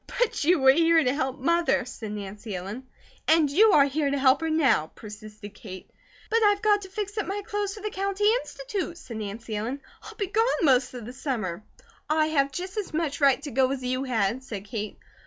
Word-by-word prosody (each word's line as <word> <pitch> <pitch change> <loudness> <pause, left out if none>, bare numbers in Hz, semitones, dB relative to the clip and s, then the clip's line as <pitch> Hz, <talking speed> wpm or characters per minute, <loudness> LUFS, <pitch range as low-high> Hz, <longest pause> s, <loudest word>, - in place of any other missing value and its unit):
"But 485 -9 +1
you 350 +4 +4
were 265 -2 +6
here 330 +2 +4
to 250 -1 +1
help 265 -2 -2
Mother," 335 0 +1
said 220 -4 -7
Nancy 205 0 -6
Ellen. 205 +9 -6 0.4
"And 315 -3 +4
you 415 +7 +5
are 280 - +7
here 285 +1 0
to 280 - 0
help 270 +1 +4
her 325 - -1
now," 270 - +3
persisted 210 -1 -10
Kate. 185 -3 -11 0.4
"But 455 +1 +3
I've 410 0 +3
got 415 -1 +4
to 380 - -9
fix 410 +1 -4
up 415 - -2
my 405 +1 -3
clothes 415 -2 -2
for 420 - -10
the 425 0 -3
County 395 +1 -2 0.2
Institute," 400 -8 -5
said 250 -9 -8
Nancy 215 +1 -5
Ellen, 235 +7 -3 0.2
"I'll - - -11
be 405 - -2
gone 420 +4 +1 0.2
most 255 -3 +3
of 240 -3 -7
the 245 - -8
summer." 215 - -3 0.5
"I 310 0 +2
have 280 -3 +1
just 370 +7 -6
as 405 -6 -3
much 315 -2 -2
right 275 -2 +4
to 290 - -5
go 260 +1 +2
as 270 -2 -4
you 255 +2 -1
had," 235 0 0
said 205 -6 -7
Kate. 210 0 -5
275 Hz, 215 wpm, -26 LUFS, 230-365 Hz, 0.5 s, are